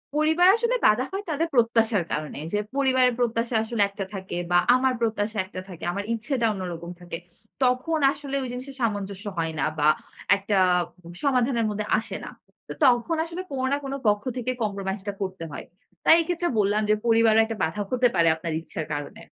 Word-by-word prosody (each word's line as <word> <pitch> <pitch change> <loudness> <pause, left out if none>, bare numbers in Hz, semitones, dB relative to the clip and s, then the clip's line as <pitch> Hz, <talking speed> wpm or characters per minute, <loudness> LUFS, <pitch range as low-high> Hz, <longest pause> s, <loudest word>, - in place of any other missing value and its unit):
পরিবার 315 +4 +4
আসলে 470 +2 +1
বাধা 215 +4 +3
হয় 390 +2 -3
তাদের 320 +2 0
প্রত্যাশার 225 -4 +3
কারণে। 150 -1 -4 0.2
যে, - - +2 0.2
পরিবারের 260 -2 +3
প্রত্যাশা 230 0 0
আসলে 225 -1 -2
একটা 200 -1 -5
থাকে 190 -2 -5
বা 175 - +5 0.2
আমার 260 0 +2
প্রত্যাশা 220 -1 -1
একটা 185 -1 -7
থাকে, 175 -2 -10
আমার 200 +2 -3
ইচ্ছেটা 230 +2 -1
অন্যরকম 175 -3 -6
থাকে। 175 -1 -6 0.5
তখন 255 +6 +1
আসলে 280 -1 -6
ওই - - -3
জিনিসের 260 +2 -7
সামঞ্জস্য 205 -2 -2
হয় 165 -1 -1
না - - +2
বা 150 - +4 0.5
একটা 200 +1 -2 0.7
সমাধানের 250 -4 +2
মধ্যে 210 0 -3
আসে 220 - -6
না। - - -7 0.4
তো - - -5
তখন 250 +6 +3
আসলে 335 +2 -6
কোনো 260 -1 -2
না 280 - +2
কোনো 275 0 -3
পক্ষ 205 0 +2
থেকে 250 +1 -1
কম্প্রোমাইজ 200 -1 -2
টা 205 - -1
করতে 185 -3 -4
হয়। - - -6 0.4
তাই 320 - +8
এই - - -4
ক্ষেত্রে 350 0 -1
বললাম 205 +1 +2
যে, 215 - +6
পরিবারে 225 -1 +4
একটা 225 -1 -5
বাধা 160 +6 -1
হতে 250 -1 +4
পারে 170 -1 +4
আপনার 160 0 -4
ইচ্ছার 160 -1 -6
কারণে। 145 0 -6
225 Hz, 185 wpm, -25 LUFS, 195-260 Hz, 0.7 s, তাই